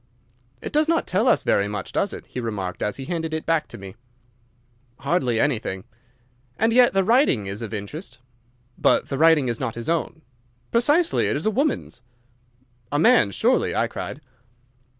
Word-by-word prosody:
"It -, -, -6 dB
does 305 Hz, +1 st, +3 dB
not 330 Hz, 0 st, +1 dB
tell 205 Hz, +7 st, +1 dB
us 245 Hz, -, +3 dB
very 100 Hz, -, +2 dB
much, 105 Hz, -2 st, -5 dB
does -, -, 0 dB
it?" -, -, -9 dB
he -, -, -7 dB
remarked, 100 Hz, -6 st, -4 dB
as 105 Hz, -, -2 dB
he 135 Hz, -, -7 dB
handed 160 Hz, -1 st, -3 dB
it 160 Hz, -, -5 dB
back 165 Hz, -2 st, +1 dB
to -, -, -10 dB
me. 95 Hz, 0 st, -10 dB, 1.1 s
"Hardly 125 Hz, -10 st, 0 dB
anything." 110 Hz, -8 st, -1 dB, 0.7 s
"And 225 Hz, +1 st, +2 dB
yet 245 Hz, -2 st, +5 dB
the 195 Hz, 0 st, +2 dB
writing 225 Hz, -, +3 dB
is 100 Hz, +3 st, -5 dB
of 115 Hz, -, -6 dB
interest." 110 Hz, -, -7 dB, 0.6 s
"But -, -, +2 dB
the 135 Hz, -, -2 dB
writing 160 Hz, -4 st, +5 dB
is 120 Hz, -1 st, -2 dB
not 130 Hz, -4 st, -3 dB
his 115 Hz, +4 st, -5 dB
own." 165 Hz, -1 st, -2 dB, 0.5 s
"Precisely. 295 Hz, +9 st, +2 dB
It -, -, 0 dB
is 145 Hz, -, -3 dB
a 220 Hz, -, +2 dB
woman's." 270 Hz, -, -2 dB, 0.9 s
"A 145 Hz, -, 0 dB
man's 155 Hz, -, +4 dB
surely," -, -, +1 dB
I -, -, +2 dB
cried. 145 Hz, -, -6 dB
150 Hz, 175 wpm, -23 LUFS, -, 1.1 s, yet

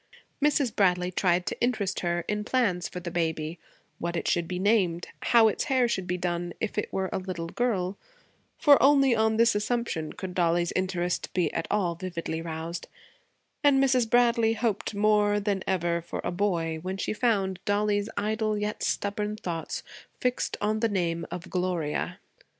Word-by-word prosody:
Mrs. 285 Hz, -5 st, +2 dB
Bradley 180 Hz, -2 st, +2 dB
tried 180 Hz, -1 st, +1 dB
to -, -, -4 dB
interest 220 Hz, -6 st, 0 dB
her 175 Hz, -1 st, -1 dB
in 210 Hz, 0 st, -1 dB
plans 210 Hz, -8 st, 0 dB
for 180 Hz, -, -6 dB
the 175 Hz, -1 st, -6 dB
baby; 160 Hz, -1 st, -2 dB, 0.4 s
what 170 Hz, 0 st, -3 dB
it -, -, -2 dB
should 170 Hz, -1 st, +1 dB
be 180 Hz, -, -3 dB
named, 185 Hz, -4 st, +2 dB, 0.2 s
and -, -, -3 dB
how 230 Hz, -2 st, +7 dB
its 215 Hz, -, 0 dB
hair 260 Hz, -3 st, +3 dB
should 190 Hz, -6 st, -2 dB
be 180 Hz, -, -1 dB
done 175 Hz, -1 st, -2 dB
if 220 Hz, -, -3 dB
it 210 Hz, -, -2 dB
were 190 Hz, -1 st, -2 dB
a -, -, 0 dB
little 180 Hz, -3 st, -5 dB
girl 195 Hz, -4 st, -1 dB, 0.6 s
for 285 Hz, -2 st, +6 dB
only 275 Hz, -2 st, +5 dB
on 220 Hz, 0 st, +2 dB
this 230 Hz, +1 st, +5 dB
assumption 210 Hz, -7 st, -1 dB
could 185 Hz, -2 st, -6 dB
Dollie's 175 Hz, -1 st, +2 dB
interest 180 Hz, -1 st, -1 dB
be 175 Hz, -5 st, +1 dB
at -, -, -2 dB
all 190 Hz, -5 st, +1 dB
vividly 170 Hz, -2 st, -4 dB
roused; 165 Hz, +1 st, -5 dB, 0.8 s
and 285 Hz, -2 st, +5 dB
Mrs. 255 Hz, -4 st, +3 dB
Bradley 235 Hz, -2 st, +4 dB
hoped 220 Hz, -2 st, -1 dB
more 205 Hz, 0 st, +3 dB
than 200 Hz, -2 st, -1 dB
ever 170 Hz, -2 st, 0 dB
for 170 Hz, -, -6 dB
a -, -, -1 dB
boy 170 Hz, -4 st, 0 dB
when 185 Hz, +2 st, -4 dB
she 195 Hz, -, -2 dB
found 200 Hz, -5 st, +1 dB
Dollie's 205 Hz, 0 st, +1 dB
idle 215 Hz, +1 st, 0 dB
yet 210 Hz, 0 st, -3 dB
stubborn 210 Hz, +1 st, -1 dB
thoughts 175 Hz, -6 st, -4 dB, 0.4 s
fixed 250 Hz, 0 st, -1 dB
on 215 Hz, +1 st, 0 dB
the 230 Hz, 0 st, +1 dB
name 170 Hz, -4 st, -1 dB
of 175 Hz, -, -6 dB
Gloria. 180 Hz, -5 st, -1 dB
190 Hz, 175 wpm, -27 LUFS, 175-220 Hz, 0.8 s, how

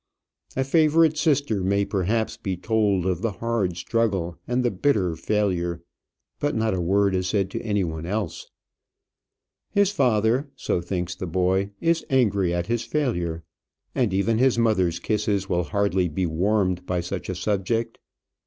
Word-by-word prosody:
A 135 Hz, -, +1 dB
favourite 155 Hz, +2 st, +4 dB
sister 145 Hz, -, +1 dB
may 100 Hz, +2 st, +2 dB
perhaps 105 Hz, +4 st, -1 dB
be 95 Hz, -2 st, -4 dB
told 105 Hz, -2 st, +1 dB
of 90 Hz, -2 st, 0 dB
the 115 Hz, -2 st, -1 dB
hard 105 Hz, -6 st, -1 dB
struggle 95 Hz, -5 st, -1 dB
and 125 Hz, +1 st, 0 dB
the 120 Hz, -, +2 dB
bitter 95 Hz, -5 st, +1 dB
failure, 85 Hz, -2 st, -1 dB, 0.6 s
but 145 Hz, 0 st, 0 dB
not 110 Hz, -1 st, +1 dB
a 90 Hz, -, -1 dB
word 100 Hz, +3 st, +2 dB
is 95 Hz, 0 st, 0 dB
said 100 Hz, -1 st, 0 dB
to -, -, -4 dB
any 105 Hz, -3 st, 0 dB
one 80 Hz, -1 st, -4 dB
else. 100 Hz, -2 st, -3 dB, 1.2 s
His 200 Hz, -1 st, +2 dB
father, 125 Hz, -, +2 dB
so 90 Hz, -, -1 dB
thinks 90 Hz, 0 st, -3 dB
the 90 Hz, +1 st, -6 dB
boy, 95 Hz, +3 st, +1 dB
is 165 Hz, 0 st, +1 dB
angry 100 Hz, -9 st, +2 dB
at 85 Hz, 0 st, -1 dB
his 115 Hz, 0 st, -1 dB
failure; 90 Hz, -, -2 dB, 0.5 s
and 120 Hz, -6 st, +1 dB
even 105 Hz, +4 st, +1 dB
his 130 Hz, -2 st, +3 dB
mother's 95 Hz, -7 st, +2 dB
kisses 105 Hz, -2 st, -1 dB
will 90 Hz, -2 st, 0 dB
hardly 100 Hz, -3 st, +1 dB
be 90 Hz, +5 st, -1 dB
warmed 90 Hz, +2 st, 0 dB
by 90 Hz, -1 st, 0 dB
such 90 Hz, +2 st, -5 dB
a 95 Hz, -, -2 dB
subject. 105 Hz, +4 st, -1 dB
100 Hz, 160 wpm, -24 LUFS, 90-115 Hz, 1.2 s, favourite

